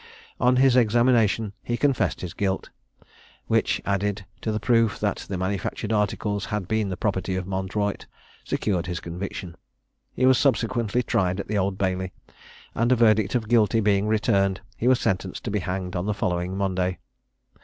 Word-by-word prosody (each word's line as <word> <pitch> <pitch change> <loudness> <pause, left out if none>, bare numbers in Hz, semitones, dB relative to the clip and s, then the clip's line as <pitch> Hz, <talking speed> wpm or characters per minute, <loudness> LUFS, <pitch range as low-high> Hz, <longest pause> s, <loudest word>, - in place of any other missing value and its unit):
On 125 +1 +4
his 130 0 +5
examination 115 -3 +3
he 120 - -2
confessed 130 -9 +1
his 90 -3 -5
guilt, 95 -1 -2 0.7
which, - - +1
added 100 0 -1 0.2
to 110 - -1
the 110 - -1
proof 115 -1 +2
that 105 -1 0
the 95 - -2
manufactured 100 +3 -2
articles 105 -1 0
had 100 0 -3
been 110 -1 0
the 95 - -4
property 95 -2 -1
of 95 0 -3
Mondroyte, 100 +2 -2 0.4
secured 90 -5 -1
his 90 -1 -3
conviction. 90 0 -6 0.6
He 130 - +2
was 130 -1 +5
subsequently 120 -3 +1
tried 95 -3 0
at - - -4
the 105 - -1
Old 95 0 -1
Bailey, 95 -1 -1 0.6
and 120 +2 +1
a - - +6
verdict 110 -2 +3
of 115 -3 0
Guilty 115 -1 +3
being 100 -1 +2
returned, 100 -3 +1
he 115 - -1
was 130 -1 +5
sentenced 95 -1 -2
to 110 - -3
be 105 - 0
hanged 90 0 -4
on 90 +3 -2
the 105 - 0
following 90 -1 -1
Monday. 95 -2 0
100 Hz, 170 wpm, -25 LUFS, 95-110 Hz, 0.7 s, a